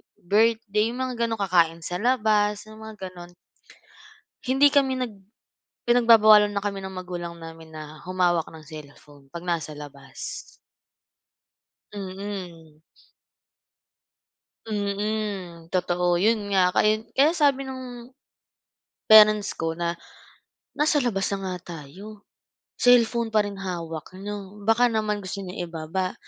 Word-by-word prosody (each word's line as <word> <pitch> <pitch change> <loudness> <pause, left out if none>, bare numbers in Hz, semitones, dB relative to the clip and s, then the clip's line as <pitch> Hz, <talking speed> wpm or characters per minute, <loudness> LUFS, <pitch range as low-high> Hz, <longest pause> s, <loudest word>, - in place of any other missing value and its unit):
birthday, 215 +2 +1
yung 255 - -4
mga 245 -2 -1
gano'n, 225 -2 -3
kakain 170 -3 +2
sa 175 +2 -3
labas, 210 -3 +2
yung 215 - -13
mga 210 -4 -8
gano'n. 175 -1 -12 1.1
Hindi 275 +2 +5
kami 270 -2 +3
nag 250 -2 -3 0.8
pinagbabawalan 220 -3 +6
na 200 - -1
kami 200 -1 -4
ng 190 - -6
magulang 175 -2 -6
namin 165 -1 -11
na 155 0 -10
humawak 180 -2 +1
ng 160 -1 -12
cellphone 145 -2 -13
'pag 170 +1 -8
nasa 165 -3 -2
labas. 145 -2 -9 1.5
Mm. 185 -5 -7 1.9
Mm, 200 -4 -3
totoo. 175 -1 +1
Yun 210 0 +1
nga. 185 -1 +3
Kaya 215 0 +3 0.2
kaya 290 +4 +5
sabi 285 -5 +2
nung 255 -2 -8 1.0
parents 215 -1 +7
ko 165 0 -2
na, 170 0 -3 0.8
"Nasa 300 -1 +3
labas 200 -6 0
na 190 -2 -3
nga 170 -3 -9
tayo, 200 +9 -12 0.6
cellphone 235 -2 +3
pa 215 - +5
rin 205 -1 -6
hawak 170 -3 -6
niyo. 205 +1 -8
Baka 225 +3 +4
naman 215 -3 0
gusto 200 0 -6
niyo 180 -1 -5
ibaba." 170 +3 -3
200 Hz, 120 wpm, -25 LUFS, 175-220 Hz, 1.9 s, parents